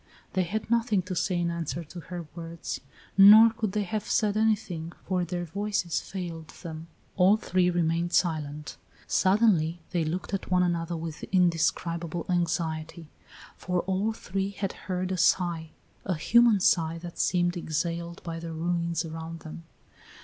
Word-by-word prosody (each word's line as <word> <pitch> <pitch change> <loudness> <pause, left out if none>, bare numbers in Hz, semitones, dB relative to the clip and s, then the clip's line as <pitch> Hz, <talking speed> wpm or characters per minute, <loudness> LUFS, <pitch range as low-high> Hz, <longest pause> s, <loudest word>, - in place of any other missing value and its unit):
They 185 - +2
had 215 +5 -3
nothing 230 -5 +2
to 185 +1 -5
say 175 +1 0
in 170 0 0
answer 170 0 -3
to 175 +3 -10
her 175 0 -7
words, 165 -1 -6 0.4
nor 215 +3 +10
could 220 -4 -3
they 210 - +1
have 210 +2 -4
said 210 -2 +2
anything, 205 -7 0
for 185 -1 0
their 175 0 -3
voices 195 -2 -1
failed 170 -4 -6 0.2
them. 160 -1 -7 0.3
All 195 +3 +6
three 185 -4 +1
remained 170 0 0
silent. 150 -4 -1 0.3
Suddenly 185 -5 +3
they 170 -2 +1
looked 170 +6 -3
at 195 - -3
one 180 0 +3
another 170 -1 -1
with 160 -1 -6
indescribable 170 -1 0
anxiety, 165 -2 -2 0.5
for 180 -1 -1
all 195 +3 0
three 195 -2 -3
had 195 -1 -4 0.2
heard 185 0 -1
a 185 - -1
sigh, 170 -2 +2 0.3
a 185 - -1
human 230 +5 +4
sigh 165 -4 +3
that 170 0 -9
seemed 175 0 +2
exhaled 170 +1 -3
by 165 -1 -5
the 165 0 -6
ruins 170 0 -1
around 165 0 -7
them. 165 +1 -9
175 Hz, 155 wpm, -28 LUFS, 165-190 Hz, 0.5 s, nor